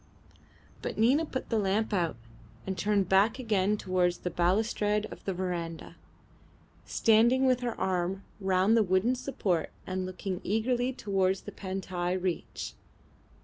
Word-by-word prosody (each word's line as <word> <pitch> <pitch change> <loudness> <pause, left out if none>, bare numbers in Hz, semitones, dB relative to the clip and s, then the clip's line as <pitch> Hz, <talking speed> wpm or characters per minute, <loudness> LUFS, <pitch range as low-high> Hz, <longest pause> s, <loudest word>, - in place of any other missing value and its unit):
But - - -4
Nina 265 +9 +3
put 260 - -5
the 225 - +2
lamp 210 +2 0
out 170 -4 +1 0.5
and 190 - -2
turned 200 +1 +1
back 200 +6 +4
again 210 -4 +1
towards 180 -2 +1
the 180 - -4
balustrade 210 +4 +1
of - - -10
the 195 - -1
verandah, 175 -3 -4 0.9
standing 235 +4 +4
with 255 -1 +3
her 240 -2 -3
arm 190 +1 -1 0.2
round 190 +2 +3
the 230 - +5
wooden 190 +5 +2
support 205 - -1 0.2
and 185 0 -3
looking 185 0 -4
eagerly 245 +5 +1
towards 195 -5 0
the - - -8
Pantai 185 -2 -3
reach. 180 -2 -3
195 Hz, 140 wpm, -29 LUFS, 185-225 Hz, 0.9 s, the